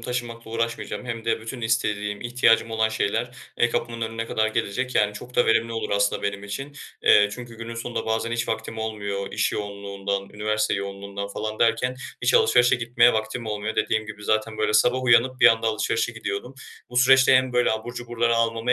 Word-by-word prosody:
taşımakla 120 -2 -5
uğraşmayacağım 115 +2 -3
hem 115 -1 -5
de 115 - 0
bütün 115 +3 -7
istediğim, 105 -2 -1
ihtiyacım 120 -2 +2
olan 110 0 +1
şeyler, 110 +2 -1 0.3
eee, 120 - +3
kapımın 115 -1 -3
önüne 115 0 -3
kadar 110 -1 0
gelecek 115 +4 -2
yani 105 -1 +3
çok 125 +4 -10
da 125 - +4
verimli 115 +1 +2
olur 115 - -3
aslında 100 0 +1
benim 100 0 -3
için. 135 +8 -6 0.3
Eee, 105 0 +6
çünkü 120 0 -9
günün 115 0 -6
sonunda 115 0 -4
bazen 110 +1 -1
hiç 115 0 -2
vaktim 110 0 -4
olmuyor 100 -3 -4
iş - - 0
yoğunluğundan, 100 -1 -4
üniversite 105 0 -1
yoğunluğundan 100 0 -5
falan 110 +1 -5
derken 120 +2 +1 0.3
hiç 125 +1 +2
alışverişe 125 +1 +5
gitmeye 120 0 +3
vaktim 110 +1 -3
olmuyor. 105 +1 -3
Dediğim 110 0 0
gibi, 105 -1 -9
zaten, 110 0 0
böyle, 105 0 +1
sabah 125 +4 +3
uyanıp 130 +1 +3
bir - - +8
anda 115 0 +4
alışverişe 115 +1 0
gidiyordum. 110 +3 -5 0.4
Bu 125 - -7
süreçte 135 +1 +6
hem 130 0 +1
böyle 125 0 +3
abur 115 +2 -5
cuburları 120 -1 0
almamı 115 +1 +1
115 Hz, 185 wpm, -24 LUFS, 105-120 Hz, 0.4 s, bir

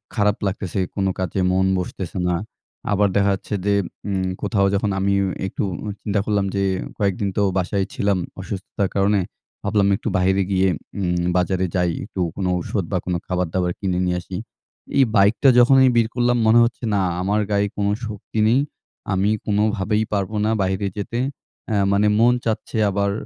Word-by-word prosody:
খারাপ 105 -1 +2
লাগতেছে, 95 -1 -3 0.2
কোনো 95 -1 +1
কাজে 95 +1 -2
মন 95 +1 +2
বসতেছে 90 0 -5
না। 90 - +1 0.6
আবার 100 0 +3
দেখা 100 0 +3
যাচ্ছে 100 - -5
যে, 100 - +3 0.3
উম 95 -2 -1
কোথাও 100 -4 +1
যখন 100 +1 0
আমি 100 +1 +1 0.3
একটু - - -3 0.4
চিন্তা 100 -1 0
করলাম 100 -2 +1
যে, 100 - +1 0.3
কয়েকদিন 100 -1 0
তো - - +3 0.2
বাসায় 95 +1 0
ছিলাম 100 -2 +1 0.2
অসুস্থতার 95 +1 -3
কারণে। 100 +1 +3 0.4
ভাবলাম 100 -1 +2
একটু - - -6
বাহিরে 95 +1 +2
গিয়ে 95 0 +3 0.3
উম 90 -2 0
বাজারে 95 +1 +1
যাই। 90 -2 +2
একটু 95 -2 -8 0.2
কোনো 95 -2 -1
ওষুধ 95 +2 -2
বা 95 - +1
কোনো 90 -1 0
খাবার-দাবার 90 0 -1
কিনে 90 -3 -1
নিয়ে 90 0 0
আসি। 90 0 -7 0.6
এই 135 - +7
বাইকটা 105 +6 +5
যখনই 130 +1 +6
বের 115 -1 +4
করলাম 120 0 +2
মনে 115 +2 +6
হচ্ছে 120 +2 -2
না, 100 - +2 0.2
আমার 100 +3 +1
গায়ে 100 0 +2
কোনো 100 0 +1 0.2
শক্তি 110 +1 -5
নেই। 125 +4 +4 0.5
আমি 95 +2 +2 0.2
কোনোভাবেই 105 0 +1
পারবো 100 +1 -1
না - - +2
বাহিরে 95 +1 0
যেতে। 115 +4 -3 0.5
এ্যা 105 -2 +1
মানে 100 +1 +3
মন 120 +1 +5
চাচ্ছে, 110 0 -2
আবার 100 0 0
100 Hz, 170 wpm, -21 LUFS, 95-105 Hz, 0.6 s, এই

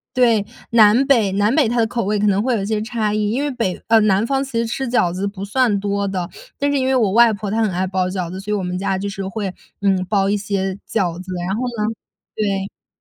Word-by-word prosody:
对， 230 -5 +4 0.3
南 230 +3 +6
北 230 -8 +3
南 205 +4 +2
北 285 -8 +3
它 240 - -1
的 230 - +3
口 235 -2 -2
味， 210 +1 0
可 205 - +1
能 200 -1 +3
会 245 +1 +1
有 200 - -1
一 - - -2
些 215 0 -1
差 220 -2 -1
异。 210 -1 0
因 255 +7 -1
为 290 - -1
北 230 -8 -2
呃， 225 -1 +6
南 205 0 +3
方 270 +2 0
其 265 -4 -5
实 230 - +1
吃 250 +2 -3
饺 180 -8 +2
子 195 +3 -2
不 200 -1 -6
算 210 -1 +1
多 200 0 -1
的， 185 -3 -3 0.3
但 285 0 0
是 285 - +1
因 260 - 0
为 265 - +2
我 220 -6 +2
外 235 +1 +6
婆 205 -1 -4
她 225 +1 +1
很 215 -3 +1
爱 185 +1 -1
包 185 -1 -1
饺 185 -2 -3
子， 190 - -6
所 205 +2 -5
以 210 - +1
我 195 - -3
们 180 0 -3
家 195 0 -1
就 200 +2 -3
是 195 -1 -5
会， 195 -2 -4 0.3
嗯， 190 -2 +2
包 195 -2 +2
一 205 - +2
些 195 -2 -2 0.2
饺 180 -6 -1
子。 185 0 -9 0.2
然 195 - -1
后 240 - -3 0.2
呢 215 +2 -1 0.4
对， 195 -2 -3
210 Hz, 290 characters per minute, -20 LUFS, 195-230 Hz, 0.4 s, 南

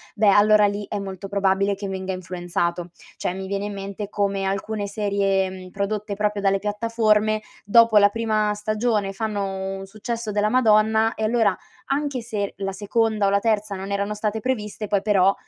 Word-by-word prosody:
beh, 215 -1 +3
allora 210 +1 +6
lì 205 0 -1
è 205 - -2
molto 195 0 -6
probabile 200 0 +1
che 200 0 -6
venga 190 0 -4
influenzato. 175 -1 -3 0.3
Cioè, - - -2
mi 190 0 -6
viene 200 0 -2
in 205 - -4
mente 200 +1 -6
come 200 -1 -1
alcune 200 +2 -2
serie, 200 -2 0
mhmm, 185 -1 -9
prodotte 200 +2 -3
proprio 210 0 -1
dalle 195 0 +2
piattaforme, 215 0 +1 0.2
dopo 225 +1 +5
la 205 0 +7
prima 215 -1 0
stagione 210 -1 -1
fanno 195 -2 -3
un 195 - -7
successo 220 +2 -5
della 210 +1 +2
Madonna 220 -2 +3
e 220 - -4
allora, 215 -3 +2 0.3
anche 280 -2 -1
se 215 -4 -3
la 195 -1 -3
seconda 215 +1 +1
o - - +3
la 200 0 +3
terza 215 -2 0
non 190 +1 -6
erano 200 +1 -1
state 210 +1 -2
previste, 210 -3 -3
poi 200 -1 +1
però, 195 -2 +4
205 Hz, 180 wpm, -23 LUFS, 195-215 Hz, 0.3 s, la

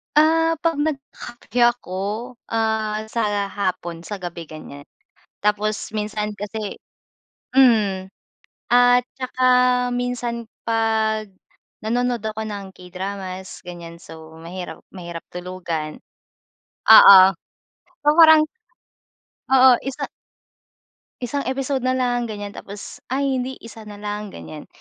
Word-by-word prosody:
Ah, 325 +2 +4
'pag 330 -3 +1
nagkakape 275 -5 -4 0.2
ako, 245 -7 -15 0.6
ah, 220 -1 -1
sa 205 -3 -1
hapon, 180 -4 -3
sa 190 +5 -6
gabi, 175 -3 -7
ganiyan, 145 -2 -11 0.6
tapos 210 +1 0
minsan 210 0 -3
kasi 205 0 -5 0.8
hmm, 210 -8 +4 0.6
at 245 0 +5
saka 255 0 -4 0.5
minsan 240 -2 -3 0.2
'pag 220 -1 0 0.6
nanonood 240 0 0
ako 220 0 -3
ng 200 -3 -6
K-dramas, 185 +1 -7
ganiyan 170 -1 -10
so 160 0 -12
mahirap 180 +2 -7
mahirap 170 -3 -8
tulugan 175 -4 -5 0.9
oo 220 -2 +11 0.9
so 295 - -7
parang 315 -2 +8 1.1
oo 260 0 +7
1 270 0 -4 1.2
isang 275 +3 -2
episode 265 +1 -1
na 255 0 0
lang, 245 -2 0
ganiyan 205 -2 -6
tapos 200 0 -9
ay 265 0 0
hindi, 260 +1 -4
1 225 -1 -11
na 205 - -9
lang 210 0 -5
ganiyan, 80 - -10
215 Hz, 105 wpm, -22 LUFS, 190-245 Hz, 1.2 s, oo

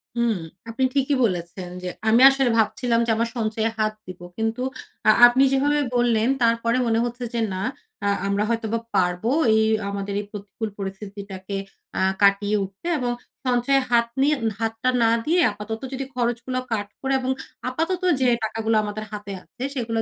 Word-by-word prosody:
হুম। 235 -2 +1 0.3
আপনি 230 +4 -2
ঠিকই 275 0 +2
বলেছেন 180 -2 -4
যে 180 - -2 0.2
আমি 230 +3 +5
আসলে 270 -2 +2
ভাবছিলাম 230 +2 +1
যে - - +3
আমার 230 +1 0
সঞ্চয়ে 220 0 0
হাত 215 -1 +1
দিবো। 180 -1 -9
কিন্তু 225 +2 -1 0.5
আ - - +8 0.2
আপনি 255 +3 +3
যেভাবে 290 +2 +2 0.2
বললেন 235 -2 +2 0.2
তারপরে 230 +1 +2
মনে 225 0 +2
হচ্ছে 240 +1 -5
যে, 235 - -1
"না 185 +1 -3 0.4
আ - - +2 0.2
আমরা 200 +1 +1
হয়তো 230 -1 -1
বা 230 - +1 0.2
পারবো 180 +6 +1 0.2
এই 220 - +4 0.2
আমাদের 200 0 -4
এই - - -10
প্রতিকূল 205 +1 -6
পরিস্থিতিটাকে 195 0 -6 0.4
আ - - +1 0.2
কাটিয়ে 200 +1 +4
উঠতে" 195 - -8
এবং 245 -1 -1 0.3
সঞ্চয়ে 255 +2 +2
হাত 235 -1 +4
নিয়ে 295 +2 +4 0.2
হাতটা 225 +2 -1
না 225 - +4
দিয়ে 345 +3 +3
আপাতত 210 +3 -6
যদি 265 0 -3
খরচগুলো 240 +1 -1
কাট 205 -2 -1
করে 270 0 0
এবং 260 +1 -1 0.4
আপাতত 330 +7 -1 0.2
যে 255 - +4 0.2
টাকাগুলো 225 0 0
আমাদের 210 +1 -4
হাতে 205 -1 -6
আছে, 245 - -17
সেগুলা 230 -3 -1
225 Hz, 170 wpm, -23 LUFS, 205-245 Hz, 0.5 s, আ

